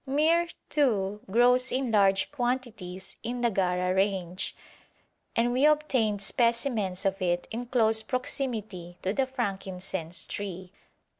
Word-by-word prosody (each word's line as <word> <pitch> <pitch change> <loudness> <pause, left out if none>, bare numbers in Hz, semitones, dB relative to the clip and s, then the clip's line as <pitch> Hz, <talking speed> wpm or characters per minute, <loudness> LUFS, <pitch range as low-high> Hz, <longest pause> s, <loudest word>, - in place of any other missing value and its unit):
Myrrh, 320 +5 +3 0.2
too, 210 -8 +1
grows 250 +4 +4
in 255 -2 -1
large 195 -2 +3
quantities 240 -8 -3
in 240 +1 -4
the 235 -1 +2
Gara 180 -1 +1
range, 190 -2 -1 0.8
and 240 +1 +2
we 255 +2 +1
obtained 255 -9 +2
specimens 230 -5 +1
of 195 0 0
it 175 -1 0
in 240 +2 -4
close 225 -3 +4
proximity 220 - -3
to 190 - 0
the 265 +2 +1
frankincense 190 -8 -4
tree. 185 -2 -5
220 Hz, 125 wpm, -28 LUFS, 190-250 Hz, 0.8 s, grows